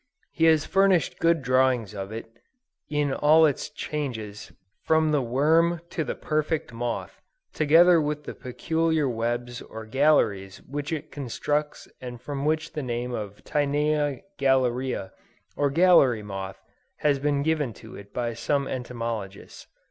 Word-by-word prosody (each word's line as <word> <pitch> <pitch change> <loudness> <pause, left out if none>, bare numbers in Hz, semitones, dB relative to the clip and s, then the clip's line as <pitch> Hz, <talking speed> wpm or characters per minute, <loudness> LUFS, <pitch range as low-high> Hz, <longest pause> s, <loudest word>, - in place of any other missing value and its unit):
He 165 - +1
has 160 -2 +4
furnished 195 -3 +2
good 165 -3 +2
drawings 130 -4 +2
of 100 0 -6
it, 110 +1 -6 0.6
in 150 -2 0
all 155 +3 +5
its 145 -1 -1
changes, 115 -10 -5 0.3
from 160 -1 +3
the 145 -2 +2
worm 160 +7 +2
to 160 - -1
the - - -4
perfect 155 -3 -2
moth, 120 +1 -4 0.3
together 165 +3 +5
with 150 0 -2
the - - -6
peculiar 160 +4 -1
webs 120 0 -2
or 110 0 -9
galleries 110 -7 +2
which 145 +2 -5
it 155 -1 -4
constructs 145 +2 -3
and 125 -1 -7
from 140 +2 -5
which 155 +1 0
the 150 - -3
name 120 -1 -3
of 105 -2 -6
Tinea 145 -1 0 0.2
Galleria 130 -5 +1 0.4
or 145 -1 +1
gallery 140 -8 +5
moth, 95 -1 -6 0.4
has 145 -2 +2
been 145 0 0
given 150 -5 0
to 110 +4 -12
it 100 0 -12
by 120 -1 -2
some 140 +4 -1
entomologists. 115 -6 -5
140 Hz, 140 wpm, -26 LUFS, 120-155 Hz, 0.6 s, all